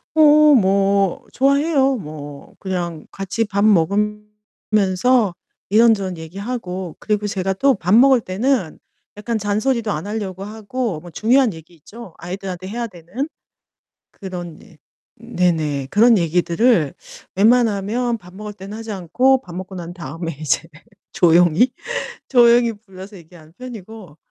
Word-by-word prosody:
어 300 -1 +6
뭐 195 -2 +2
좋아해요. 275 0 +2
뭐 150 - -9
그냥 175 -4 -4
같이 195 +4 -2
밥 200 0 -1
먹으면서 210 +2 +1 0.4
이런저런 205 -5 +3
얘기하고 185 0 -6
그리고 210 -1 -1
제가 195 -1 -2
또 270 +6 +2
밥 185 +2 +1
먹을 260 +1 +6
때는 210 - -1 0.4
약간 220 +2 -3
잔소리도 215 +2 -1
안 160 +4 -4
하려고 195 -3 -5
하고 215 -2 -4
뭐 175 - -12
중요한 235 - +2
얘기 160 +2 -14
있죠 200 +4 -13
아이들한테 185 0 -6
해야 235 +3 -4
되는. 190 - -6 0.8
그런 175 -4 -8
일 185 -8 -19 0.4
네네 165 - -1
그런 225 +2 +5
얘기들을 170 - +2 0.4
웬만하면 230 +2 +2
밥 180 -3 -16
먹을 210 +1 -7
때는 200 +1 -9
하지 225 -1 -7
않고 250 +9 +2
밥 175 -5 -11
먹고 185 +1 -7
난 175 0 -7
다음에 165 -1 -6
이제 155 - 0 0.5
조용히, 175 +7 +4 0.6
조용히 235 -2 +5
불러서 200 -1 -13
얘기하는 165 -2 -17
편이고, 220 -9 -10
200 Hz, 280 characters per minute, -20 LUFS, 180-230 Hz, 0.8 s, 어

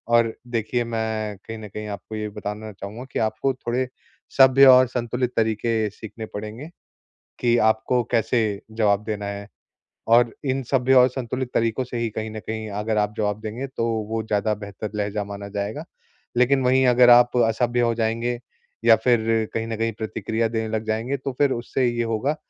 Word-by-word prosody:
और 115 -1 +3 0.2
देखिए 115 +2 0
मैं 110 -2 -3
कहीं 110 +3 -9
न 110 - -8
कहीं 105 +2 -6
आपको 105 +2 -7
ये 105 0 -3
बताना 105 +1 -6
चाहूँगा 100 +5 -8
कि - - -1
आपको 115 +5 0
थोड़े 125 +1 -2 0.5
सभ्य 135 0 +7
और 130 0 +8
संतुलित 125 0 -2
तरीके 110 0 +1
सीखने 110 +2 -8
पड़ेंगे 110 +8 -6 0.7
कि 120 -1 +3
आपको 115 +3 0
कैसे 115 0 +2 0.3
जवाब 105 -2 +1
देना 105 -2 -4
है। 100 0 -6 0.6
और 115 0 +4
इन 135 0 0
सभ्य 130 -1 +3
और 125 0 +7
संतुलित 130 0 -4
तरीकों 115 +2 +1
से 125 -1 -6
ही 115 -1 -1
कहीं 110 +1 -4
न 110 - -6
कहीं 110 0 -5
अगर 110 0 -1
आप 105 0 +1
जवाब 105 -1 -1
देंगे 115 +5 -5
तो 130 -3 -3 0.2
वो 110 0 -2
ज़्यादा 105 0 0
बेहतर 100 +1 -7
लहज़ा 105 0 -2
माना 100 0 -7
जाएगा। 100 +1 -4 0.5
लेकिन 130 +2 +3
वही 130 +1 +4
अगर 125 0 +6
आप 120 0 +6
असभ्य 120 +2 +1
हो 120 -1 +2
जाएँगे 115 +1 -1 0.5
या 115 -1 +8
फिर 120 -3 +4 0.3
कहीं 115 0 -2
न 115 - -3
कहीं 115 +1 0
प्रतिक्रिया 110 +1 -1
देने 110 -1 -2
लग 110 - -2
जाएँगे 110 +5 -1
तो 135 +1 -4
फिर 145 -2 +4
उससे 120 +2 -1
ये 120 0 0
होगा 115 +6 -1
115 Hz, 180 wpm, -23 LUFS, 110-125 Hz, 0.7 s, और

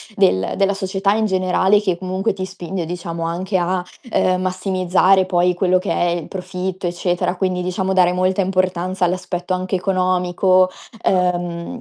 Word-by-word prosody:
del 140 - +2
della 200 0 +2
società 195 0 0
in 220 +1 +1
generale 190 +1 +2
che 185 -5 0
comunque 185 +3 -1
ti 185 - -4
spinge, 185 -2 -5
diciamo, 170 0 -5
anche 180 +4 -1
a, 180 +1 0 0.3
ehm, 185 -3 +2
massimizzare 185 0 +2
poi 180 -1 +2
quello 180 +1 +2
che 185 +2 -3
è - - +1
il 170 -2 -3
profitto, 185 0 -4
eccetera, 175 +1 -1
quindi, 185 -1 -1
diciamo, 185 +1 -1
dare 180 -2 +4
molta 185 +1 0
importanza 185 -1 -1
all'aspetto 180 0 -2
anche 185 +1 -2
economico, 185 0 +2 0.3
ehm, 175 +3 0
185 Hz, 150 wpm, -19 LUFS, 180-190 Hz, 0.3 s, dare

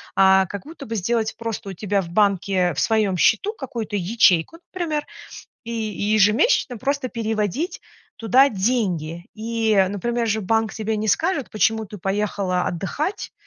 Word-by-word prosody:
а 190 0 +5
как 200 +1 -7
будто 315 -3 -10
бы 225 - -4
сделать 220 +2 -1
просто 225 -3 -5
у - - -5
тебя 200 +2 -1
в 170 - -9
банке 190 -1 +2
в - - -2
своем 215 -4 +1
счету 230 - +2
какую-то 230 -6 -5
ячейку, 190 - +2 0.2
например, 320 -5 -2 0.6
и 230 - -6
ежемесячно 215 - +2
просто 275 +1 -1
переводить 225 - -2 0.4
туда 255 +5 +4
деньги. 190 -7 -1
И, 225 0 0
например, 235 +4 -2
же 220 0 0
банк 225 +3 +1
тебе 220 0 -2
не 215 +1 -2
скажет: 320 - 0
почему 220 0 +1
ты 205 +1 -10
поехала 195 -1 -1
отдыхать, 295 - -3
215 Hz, 145 wpm, -22 LUFS, 195-235 Hz, 0.6 s, а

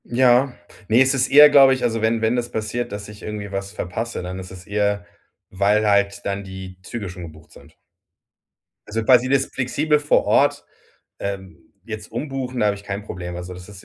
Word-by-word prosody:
Ja. 125 +1 +3 0.3
Ne, 115 +4 +4
es 135 0 +4
ist 135 - +1
eher, 150 +1 +9
glaube 135 -2 +7
ich 130 - -6
also, 115 -1 0
wenn 110 +1 +1
wenn 110 +2 +1
das 120 -1 -2
passiert, 110 +2 -3
dass 100 0 -6
ich 105 -1 -12
irgendwie 105 -2 -6
was 100 0 -4
verpasse, 105 +4 -4
dann 90 +1 -6
ist 90 -1 -9
es 90 -1 -11
eher, 100 -1 -1 0.5
weil 105 +3 +2
halt 100 0 +1
dann 100 0 -2
die 95 -1 -9
Züge 105 +1 -6
schon 90 0 -9
gebucht 80 -1 -13
sind. - - -17 1.1
Also 115 +1 -2
quasi 125 +1 +5
das 135 0 +3
flexibel 150 +4 0
vor 150 0 +2
Ort, - - +2 0.5
ähm, 95 -1 -6 0.3
jetzt 110 -1 -8
umbuchen, 130 -3 -4
da 105 - +3
habe 100 -1 +1
ich 100 - -14
kein 100 0 -4
Problem. 90 -3 -7
Also, 90 +1 -7
das 90 +1 -12
ist 100 -1 -13
105 Hz, 200 wpm, -21 LUFS, 100-125 Hz, 1.1 s, eher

